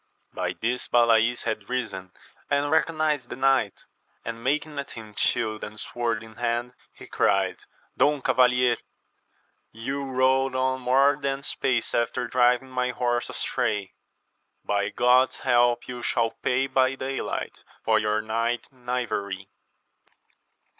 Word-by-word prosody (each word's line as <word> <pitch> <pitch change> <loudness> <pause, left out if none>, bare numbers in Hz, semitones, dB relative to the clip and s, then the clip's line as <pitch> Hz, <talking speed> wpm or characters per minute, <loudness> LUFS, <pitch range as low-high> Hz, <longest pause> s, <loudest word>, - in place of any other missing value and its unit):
By - - -2
this 120 +2 -2
Balays 115 0 +3
had 110 -2 -3
risen 105 -8 -3 0.4
and 145 0 +1
recognized 155 -5 +1
the - - -5
knight, 130 -6 +1 0.4
and 115 0 -6
making 150 +2 -1
at 140 - -5
him 110 -2 -10
shield 110 0 0
and 110 0 -7
sword 115 -2 -2
in 110 0 -14
hand, 120 +1 -1 0.2
he - - -13
cried, 95 -1 0 0.3
Don 145 0 +3
Cavalier, 125 -1 +3 0.9
you 135 +5 -4
rode 130 0 +2
on 130 0 0
more 135 +3 +4
than 135 0 -1
apace 125 -3 -1
after 120 +1 0
driving 125 +1 +2
my 125 -1 0
horse 120 -1 -1
astray: 100 -2 -2 0.7
by 100 0 0
Grod's 125 +2 +3
help 120 -1 +3
you 125 -1 -6
shall 115 -1 +1
pay 130 +1 0
by 130 0 +2
(\aylight, 135 +1 -4 0.2
for 110 -1 +4
your 105 0 0
night 115 +2 -1
knavery 110 -7 -3
125 Hz, 130 wpm, -26 LUFS, 115-130 Hz, 0.9 s, more